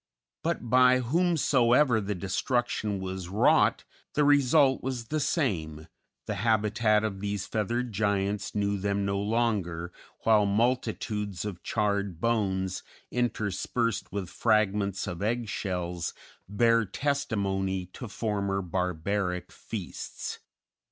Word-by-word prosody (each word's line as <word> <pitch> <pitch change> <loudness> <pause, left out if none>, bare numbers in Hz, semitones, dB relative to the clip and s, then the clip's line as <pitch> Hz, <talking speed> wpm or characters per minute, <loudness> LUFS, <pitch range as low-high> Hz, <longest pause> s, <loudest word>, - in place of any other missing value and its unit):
But 165 -7 -2
by 125 +1 +6
whomsoever 130 -5 +3
the 100 0 -2
destruction 105 +2 -1
was 95 -1 -5
wrought, 100 +3 +3 0.3
the 150 - +4
result 140 -1 +4
was 125 -3 -4
the 155 - 0
same, 85 - -1 0.4
the - - -2
habitat 110 -1 +2
of 100 -3 -2
these 100 -1 -2
feathered 115 +3 -1
giants 100 0 -1
knew 100 -1 0
them 100 0 0
no 100 0 0
longer, 100 -6 -1 0.3
while 105 -2 +4
multitudes 105 -3 -1
of 95 -4 -5
charred 100 -4 -1
bones, 95 -5 0 0.3
interspersed 115 -3 -1
with 95 -2 -4
fragments 105 -2 +1
of 85 - -5
egg 115 +2 0
shells, 90 -4 -3 0.3
bear 115 +2 +3
testimony 100 -7 -1
to 125 - -7
former 100 -2 -1
barbaric 90 +1 -2
feasts. - - -6
105 Hz, 110 wpm, -28 LUFS, 95-120 Hz, 0.4 s, by